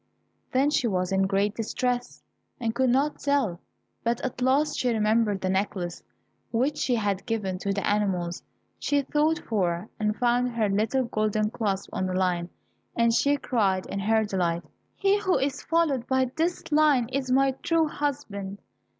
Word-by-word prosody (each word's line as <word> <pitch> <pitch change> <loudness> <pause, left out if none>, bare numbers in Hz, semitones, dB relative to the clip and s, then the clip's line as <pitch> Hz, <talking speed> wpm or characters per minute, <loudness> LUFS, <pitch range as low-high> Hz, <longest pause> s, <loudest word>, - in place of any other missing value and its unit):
Then 275 +3 +3
she 255 -5 +2
was 185 -3 -1
in 190 0 +2
great 200 +1 +1
distress, 245 +2 -2 0.4
and 230 -2 -1
could 260 +2 +2
not 275 +4 +1
tell; 275 -12 0 0.4
but 235 0 0
at 255 -1 -4
last 275 +4 +2
she 250 - +1
remembered 215 -2 +2
the 185 - -1
necklace 190 -2 -2 0.5
which 260 +6 0
she 250 - +1
had 200 -4 -1
given 195 -5 -2
to 200 - -1
the 200 0 -1
animals, 190 -4 0
and - - -37 0.4
she 285 -1 +1
sought 310 +2 +3
for 185 - -1
and 210 0 0
found 245 0 +1
her 220 -3 +1
little 220 +6 +1
golden 215 -2 0
clasp 200 -5 -2
on 185 - -1
the 185 - -2
lion, 180 -2 0 0.5
and 235 -1 +3
she 285 +4 +3
cried 195 -8 0
in 200 - -4
her 220 +2 +2
delight, 175 -4 -1 0.3
"He 395 +1 +2
who 380 -6 +2
is 275 +1 -1
followed 305 -7 +1
by 260 -1 +1
this 335 +2 0
lion 295 -5 +4
is 260 0 -2
my 270 +1 +4
true 330 -1 +2
husband". 215 -10 -4
230 Hz, 170 wpm, -26 LUFS, 195-270 Hz, 0.5 s, lion